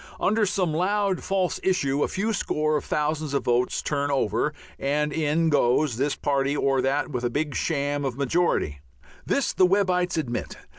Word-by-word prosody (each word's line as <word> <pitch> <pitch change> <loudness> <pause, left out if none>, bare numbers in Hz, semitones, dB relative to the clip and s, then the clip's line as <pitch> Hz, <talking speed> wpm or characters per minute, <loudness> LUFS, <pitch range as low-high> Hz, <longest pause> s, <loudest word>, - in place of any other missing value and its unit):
Under 215 +1 +2
some 180 -4 0
loud 195 +3 0
false 190 -2 0
issue 145 -7 +1
a - - +2
few 220 +4 -1
score 155 -6 0
of 145 - -1
thousands 150 -1 -1
of - - 0
votes 120 +1 +1
turn 145 -1 -1
over, 140 -2 0 0.3
and 150 +2 0
in 160 +1 +1
goes 130 -2 +2
this 140 +3 0
party 140 0 0
or 135 -2 +2
that 140 +3 0
with 125 -3 -3
a 120 - +1
big 145 +3 -2
sham 145 -2 -1
majority. 135 - 0 0.5
This 280 - +1
the 185 - +4
Webbites 180 -2 +1
admit. 125 -7 -3
150 Hz, 165 wpm, -25 LUFS, 140-180 Hz, 0.5 s, the